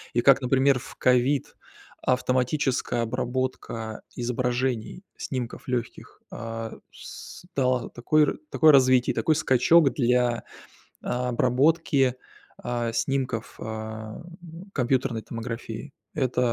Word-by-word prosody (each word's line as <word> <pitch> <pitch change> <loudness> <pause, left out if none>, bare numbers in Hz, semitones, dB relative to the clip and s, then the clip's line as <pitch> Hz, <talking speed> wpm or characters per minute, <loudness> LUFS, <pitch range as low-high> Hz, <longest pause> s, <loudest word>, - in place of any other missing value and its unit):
и 120 - +3
как, 135 +1 +6
например, 130 +1 +3
в - - -11
ковид 125 +2 +2 0.5
автоматическая 125 -1 +1
обработка 125 -2 -3
изображений, 125 - -2
снимков 125 -2 -5
легких, 120 -2 -4
а, 115 -1 -5 0.2
с - - -11
дала 125 -2 +1
такое 150 +5 +3
ра - - -1 0.2
такое 155 -1 +6
развитие 130 -2 +5
и - - -17
такой 155 - +2
скачок 145 +2 +4
для 125 -2 +2 0.6
обработки, 130 +3 +2 0.5
а, 120 -1 -2
снимков, 130 -2 -2
а, 110 0 -6 0.5
компьютерной 125 -3 0
томографии. 115 +3 -6 0.2
Это 125 -3 +1
125 Hz, 100 wpm, -26 LUFS, 120-135 Hz, 0.6 s, как